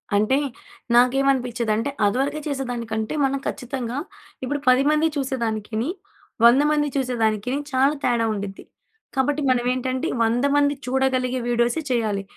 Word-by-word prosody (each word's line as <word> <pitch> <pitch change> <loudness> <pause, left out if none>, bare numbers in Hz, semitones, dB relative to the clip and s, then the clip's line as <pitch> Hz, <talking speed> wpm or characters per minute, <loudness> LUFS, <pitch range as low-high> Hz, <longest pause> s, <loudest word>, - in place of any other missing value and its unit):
అంటే 215 +7 +3 0.6
నాకేమనిపించేదంటే, 245 -2 +2 0.2
అదివరకే 275 +8 0
చేసేదానికంటే 235 -5 -3
మనం 270 +1 0
ఖచ్చితంగా 250 -1 -4 0.5
ఇప్పుడు 290 +3 -2
10 255 +1 +5
మంది 305 +1 +3
చూసేదానికిని 230 -2 -2 0.6
100 245 +4 +7
మంది 295 -1 +2
చూసేదానికిని 245 -2 0
చాలా 270 +3 +3
తేడా 235 -2 +2
ఉండిద్ది. 200 -1 -6 0.5
కాబట్టి 285 +3 +1
మనం 245 -1 +2
ఏంటంటే, 255 0 -2 0.2
100 235 +4 +1
మంది 285 0 +3
చూడగలిగే 255 -1 0
వీడియోసే 240 +5 +1
చేయాలి. 215 -5 0
250 Hz, 115 wpm, -23 LUFS, 230-270 Hz, 0.6 s, 100